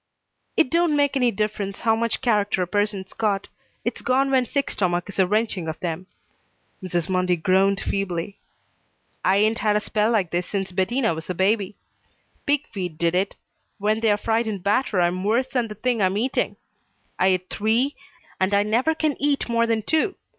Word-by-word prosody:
"It 260 - +3
don't 335 -2 +3
make 285 -1 +2
any 250 -3 +3
difference 205 -2 -3
how 225 -1 +3
much 230 0 -1
character 205 -5 +2
a - - -4
person's 205 -1 -1
got, 205 -3 -1 0.4
it's - - -2
gone 270 +2 +2
when 260 -2 +3
sick 280 +4 -1
stomach 175 -2 0
is 200 - -7
a 190 - +4
wrenching 210 -4 0
of 160 - -4
'em." 175 +1 -3 0.7
Mrs. 175 -3 -2
Mundy 185 -1 +1
groaned 190 +3 +2
feebly. 195 -1 -3 0.8
"I 190 +1 +4
'ain't 215 +3 +2
had 210 -2 +2
a - - +4
spell 210 +1 0
like 205 -7 +1
this 175 +1 -1
since 195 -2 -3
Bettina 220 +5 +1
was 160 +2 -7
a 180 - -2
baby. 200 +2 +1 0.7
Pig 290 0 +2
feet 180 -6 -5
did 170 0 +1
it. 190 +2 0 0.4
When 215 +1 +1
they're 220 -2 +3
fried 225 +2 0
in 210 -2 -2
batter 205 +2 +1
I'm 175 +1 +1
worse 230 +6 +2
than 245 -3 0
the 210 - -8
thing 235 +1 0
I'm 190 +1 +2
eating. 250 +5 0 0.6
I 190 0 +4
et 185 0 -3
three, 230 +7 +1 0.4
and 190 +2 +2
I 200 - +4
never 245 +10 +1
can 310 -3 0
eat 285 -2 0
more 230 0 +2
than 225 -1 0
two. 320 - +1
210 Hz, 190 wpm, -23 LUFS, 185-235 Hz, 0.8 s, a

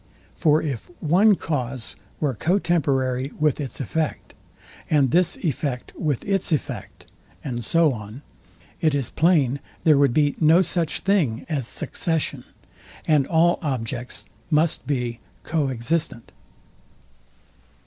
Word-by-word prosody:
For 155 -2 +2
if 135 -8 -4
one 190 +7 +4
cause 130 -7 -3 0.2
were 145 -3 0
co 170 - +1
temporary 135 -7 0
with 150 -1 +1
its 135 - -5
effect, 155 +4 -3 0.6
and 140 -5 +3
this 180 +2 +3
effect 140 -5 -2
with 145 -6 -2
its 195 -3 +1
effect, 150 - -3 0.4
and 120 -4 -4
so 165 +4 +3
on, 110 +4 -9 0.6
it 155 -3 +2
is 135 -5 -2
plain 145 -5 +2 0.2
there 155 -3 +5
would 140 -3 +4
be 145 +2 +2
no 165 +3 +5
such 165 -4 0
thing 155 - +1
as 145 -7 -2
succession, 165 +3 -1 0.6
and 150 -4 +3
all 170 +1 +3
objects 125 -4 -3 0.2
must 155 0 +1
be 125 -4 -2 0.2
co 155 -4 0
existent. 125 0 -2
145 Hz, 125 wpm, -23 LUFS, 130-165 Hz, 0.6 s, there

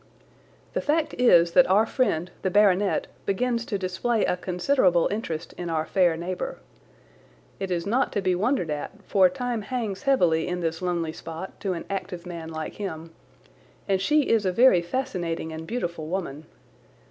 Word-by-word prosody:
The - - 0
fact 310 +1 0
is 175 -9 +6
that 265 +4 +5
our 205 +4 +5
friend, 185 -11 0
the 190 - 0
baronet, 200 0 +3 0.2
begins 235 +3 0
to 205 - -1
display 195 +4 0
a - - +1
considerable 180 0 +2
interest 175 -6 -4
in 175 -1 -4
our 160 -1 0
fair 175 -3 +2
neighbour. 185 - -4 1.0
It 195 - -3
is 175 -2 -1
not 240 +6 +1
to 205 - 0
be 185 0 +2
wondered 185 - 0
at, 150 -1 -3
for 190 -2 +4
time 245 +3 -3
hangs 215 -3 -3
heavily 175 - +2
in 180 0 -2
this 165 0 -2
lonely 170 -3 -1
spot 165 +4 -8
to 195 -2 -1
an 170 - -6
active 185 -3 -5
man 170 -2 -7
like 160 -1 -5
him, 165 -5 -6 0.7
and 190 -2 +1
she 300 +7 +3
is 225 -2 +3
a 185 - +1
very 230 -3 +5
fascinating 175 -7 -3
and 160 +1 -7
beautiful 170 -9 -3
woman. 160 -4 -4
185 Hz, 170 wpm, -25 LUFS, 170-220 Hz, 1.0 s, is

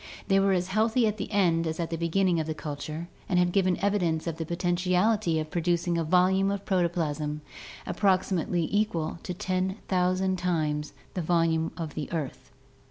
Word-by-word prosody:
They 195 0 +5
were 195 0 +3
as 180 0 0
healthy 220 +4 +2
at 215 -1 0
the 205 - -5
end 170 -5 +2
as 160 +1 -3
at 170 -1 -2
the - - 0
beginning 170 +1 +1
of 160 - -2
the 155 - -2
culture 155 +2 -5 0.2
and 180 - +2
had 180 0 +3
given 185 -2 +2
evidence 180 -6 +1
of 165 -2 -3
the 165 -2 -4
potentiality 180 +1 +1
of 155 0 -5
producing 170 0 0
a 165 - +1
volume 185 +4 +3
of 200 0 -3
protoplasm 155 -5 0 0.4
approximately 185 -4 +1
equal 170 -6 0
to 180 - -5
ten 185 +1 -1
thousand 185 0 +1
times 155 -4 -1 0.2
the 180 - -2
volume 165 -1 +1
of 160 -3 -4
the 150 -3 -5
earth! 155 -5 -4
175 Hz, 175 wpm, -28 LUFS, 160-190 Hz, 0.4 s, They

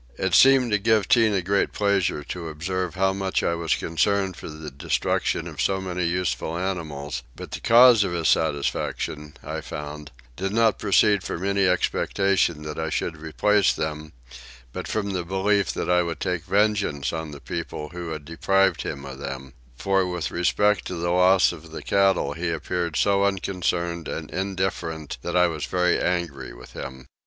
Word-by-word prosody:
It - - -1
seemed 130 -3 +6
to 105 - +3
give 110 -2 +2
Tinah 105 -6 +3
great 100 +1 +1
pleasure 100 -7 +1
to 85 +1 -6
observe 90 +2 -3
how 95 +1 +2
much 95 -1 -1
I 85 - +1
was 85 -1 0
concerned 95 +3 0
for - - -9
the 75 -1 -8
destruction 65 - -1
of - - -5
so 95 0 +1
many 90 -2 -2
useful 85 -3 -1
animals; 80 -8 -4
but - - -9
the - - -4
cause 120 -1 +7
of 95 - -2
his 85 -2 0
satisfaction, 75 0 -1
I - - -4
found, 75 0 -7 0.3
did 95 +5 -3
not 115 -1 +3
proceed 105 0 +3
from 90 +1 -4
any 100 -1 +2
expectation 90 -2 +1
that 75 0 -6
I 80 0 -2
should 80 +1 -2
replace 100 +7 +2
them, 75 0 -4 0.6
but - - -5
from 100 -2 -2
the 90 -2 -2
belief 95 +2 +1
that - - -3
I 90 0 +4
would 85 -1 -3
take 90 -3 -2
vengeance 100 - +1
on 80 -1 -4
the 75 -1 -9
people 80 -2 -5
who 85 0 -6
had 75 -2 -6
deprived 95 +3 +2
him 70 - -5
of 65 0 -8
them; 65 -1 -6 0.2
for 95 +4 +2
with 90 -3 -3
respect 105 +3 +2
to 90 - -4
the 85 +1 -1
loss 90 +1 +5
of 85 -1 -11
the 80 - -8
cattle 95 -7 +2
he 85 +2 -3
appeared 85 0 -2
so 100 -1 +3
unconcerned 90 -4 -1
and - - -5
indifferent 95 -7 -3
that 85 +4 -2
I 90 - +6
was 80 -4 -2
very 90 -1 +1
angry 85 -9 -2
with - - -13
him. 65 -1 -8
90 Hz, 180 wpm, -24 LUFS, 80-95 Hz, 0.6 s, cause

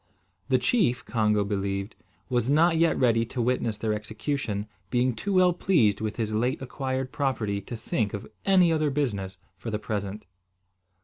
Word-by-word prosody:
The 130 - +4
chief, 125 - +1
Congo 105 -3 +2
believed, 100 0 -2 0.3
was 125 -1 0
not 165 +4 +4
yet 165 0 +3
ready 115 -3 +3
to 125 - -6
witness 120 -2 0
their 110 0 -1
execution, 105 0 -3 0.2
being 125 +1 +2
too 200 - -4
well 180 -1 +5
pleased 115 - +2
with 110 0 -2
his 110 -2 -2
late 125 +6 0
acquired 130 0 -3
property 110 -8 -1
to 115 +4 -7
think 110 -2 -1
of 100 - -6 0.2
any 185 -3 +5
other 155 -2 +1
business 100 -10 -2 0.2
for 115 - -5
the 105 - -1
present. 105 -1 -4
120 Hz, 165 wpm, -27 LUFS, 105-140 Hz, 0.3 s, well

